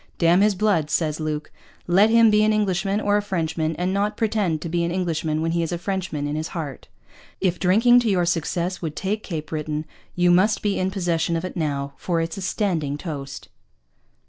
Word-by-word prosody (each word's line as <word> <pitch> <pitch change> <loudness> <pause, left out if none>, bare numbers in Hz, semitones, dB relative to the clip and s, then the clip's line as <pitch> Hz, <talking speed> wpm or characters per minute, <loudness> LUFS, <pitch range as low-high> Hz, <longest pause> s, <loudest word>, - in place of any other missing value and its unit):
Damn 170 +2 +4
his 210 -1 +3
Blood, 185 -7 +1
says 155 -2 0
Luke, 155 -1 -3 0.3
let 195 +5 +4
him 230 -1 +6
be 210 0 +4
an 215 - +3
Englishman 200 -1 0
or 205 -1 +2
a - - +1
Frenchman 165 -5 -2
and 180 +3 -1
not 205 +1 0
pretend 210 -8 0
to - - -4
be 170 +1 0
an 170 - 0
Englishman 160 -3 -1
when 165 - 0
he 170 0 0
is 165 - -2
a 175 - -1
Frenchman 180 -5 -3
in 145 +1 -2
his 155 +1 -2
Heart. 145 -5 -6 0.5
If 185 -2 0
Drinking 230 +7 +5
to 235 -2 0
your 180 -3 +2
Success 175 +1 -1
would 160 -3 -4
take 210 +3 -2
Cape 155 -6 -6
Britton 155 0 -3 0.3
you 175 0 +3
must 200 +5 +3
be 205 -2 0
in 185 - 0
possession 175 -3 -1
of 165 +2 -2
it - - -6
now, 140 -4 -2
for 170 -2 -1
it's 165 +1 -3
a - - -5
Standing 175 -7 -1
Toast. 140 -4 -7
175 Hz, 210 wpm, -23 LUFS, 160-200 Hz, 0.5 s, him